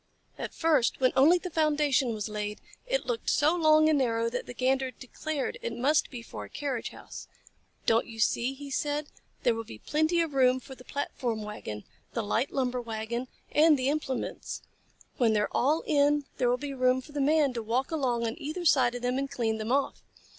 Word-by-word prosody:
At - - -6
first, 305 -7 +2
when 255 -1 +3
only 310 +7 +6
the 360 0 -6
foundation 295 -5 +2
was 215 -2 -3
laid, 210 -1 -4 0.3
it - - 0
looked 470 -2 -2
so 305 +4 +3
long 310 -2 +5
and 310 -2 +3
narrow 230 -2 +1
that 250 - -4
the - - -7
Gander 265 +1 +1
declared 270 +3 -4
it 235 0 -4
must 285 +5 +2
be 240 -3 -8
for - - -8
a - - -14
carriage 275 -5 -3
house. - - -10 0.6
"Don't 230 +1 +3
you 225 -1 -10
see?" 240 +4 +1
he 280 0 -9
said. 290 +2 -2 0.3
"There 240 - +4
will 225 0 -4
be 110 - -10
plenty 315 - +1
of 325 -3 -2
room 260 -1 +4
for 265 +1 -11
the 250 - -13
platform 245 -5 -3
wagon, 110 - -6 0.3
the 230 - -1
light 225 +6 0
lumber 250 -2 -1
wagon, 230 +2 -4 0.2
and 310 0 +5
the 260 +1 0
implements. 285 -3 -3 0.5
When 235 -4 +3
they 210 - +2
are 210 - -1
all 300 +6 +2
in, 290 0 +3
there 245 - +2
will 245 - +2
be 280 +1 -5
room 255 0 +2
for 295 - -14
the 290 -1 -2
Man 290 -1 +3
to 235 - -3
walk 240 +6 -1
along 250 -7 0
on 225 - -1
either 310 +5 -4
side 250 -6 +4
of 245 - -6
them 250 +2 0
and 275 0 -2
clean 225 -4 -1
them 215 +2 -3
off. 275 +1 0
260 Hz, 210 wpm, -29 LUFS, 235-295 Hz, 0.6 s, only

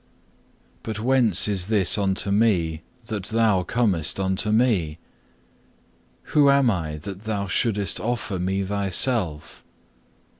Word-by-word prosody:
But 110 -1 -6
whence 115 -5 +2
is 95 -3 -1
this 105 -5 +2
unto 100 -1 +1
me, 90 -7 +1 0.2
that 105 -4 -4
Thou 110 -3 +2
comest 95 -4 -1
unto 95 +2 0
me? 105 -10 +1 1.4
Who 145 -2 +5
am 140 -3 +4
I 80 -6 -4
that 95 +4 -8
Thou 105 -2 -2
shouldest 100 -1 0
offer 110 -5 -3
me 95 +2 -1
Thyself? 95 - -1
100 Hz, 115 wpm, -23 LUFS, 95-115 Hz, 1.4 s, Who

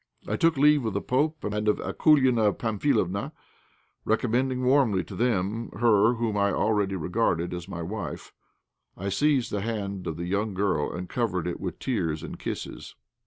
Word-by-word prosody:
I - - -1
took 165 -3 +2
leave 145 0 +5
of 110 -3 -2
the 100 - 0
pope 150 +4 0
and 105 +1 -2
of 105 - +3
Akoulina 130 -9 +3
Pamphilovna, 105 -4 0 0.7
recommending 125 +3 0
warmly 125 -8 +3
to - - -11
them 115 -1 0
her 115 0 +4
whom 115 -2 -1
I 100 0 +2
already 105 -2 +1
regarded 90 -1 0
as 90 0 -6
my 85 -3 -5
wife. 105 +5 -6 0.6
I 100 +2 -3
seized 135 +4 +1
the 105 - -1
hand 100 -4 -4
of 80 -1 -3
the 85 - -4
young 100 +2 -1
girl 95 -6 0
and 90 +1 -5
covered 100 -5 -1
it 90 - -3
with 90 - -4
tears 85 - -2
and - - -7
kisses. - - -6
105 Hz, 165 wpm, -26 LUFS, 95-125 Hz, 0.7 s, leave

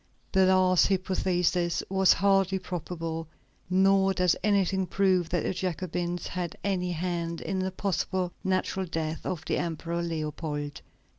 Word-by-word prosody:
The 190 -1 +4
last 185 -1 +4
hypothesis 180 -2 +1
was 190 -1 +4
hardly 195 0 +3
probable, 165 -3 -5 0.4
nor 195 +1 +4
does 180 -1 +3
anything 195 -2 +2
prove 185 -2 +2
that 170 -2 0
the - - -1
Jacobins 175 -1 -3
had 180 -2 -4
any 180 -3 0
hand 170 -1 -2
in 190 -1 -3
the 185 0 0
possibly 190 -1 -1
natural 190 0 0
death 160 -1 -3
of 160 -3 -3
the - - 0
Emperor 170 0 -2
Leopold. 155 -3 -4
180 Hz, 135 wpm, -28 LUFS, 170-190 Hz, 0.4 s, The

